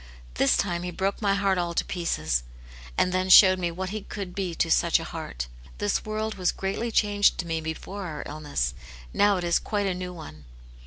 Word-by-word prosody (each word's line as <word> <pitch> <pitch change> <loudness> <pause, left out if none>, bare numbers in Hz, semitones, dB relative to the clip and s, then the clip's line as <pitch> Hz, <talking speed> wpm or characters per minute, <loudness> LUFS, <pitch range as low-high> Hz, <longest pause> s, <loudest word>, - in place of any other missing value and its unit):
This 135 - +3
time 175 -3 -1
he 180 - -4
broke 190 +4 -2
my 200 -2 +2
heart 195 -2 +1
all 170 -1 -2
to - - +1
pieces, 80 - -1 0.6
and 185 - +3
then 185 +1 0
showed 185 0 +8
me 175 -1 0
what 185 +2 -5
he 215 0 -4
could 195 -2 -7
be 185 -3 -3
to 165 - 0
such - - +4
a - - -5
heart. - - -5 0.3
This 105 - -1
world 215 -1 -3
was 180 - +2
greatly 195 +5 -3
changed 205 -2 +3
to 180 - -3
me 165 -1 -2
before 180 +5 -5
our 155 -3 -5
illness; 145 - -2 0.4
now 205 -1 +4
it 180 - -3
is 170 0 +2
quite 205 -1 -2
a 190 - 0
new 180 0 -5
one." 75 - -11
180 Hz, 210 wpm, -26 LUFS, 165-200 Hz, 0.6 s, showed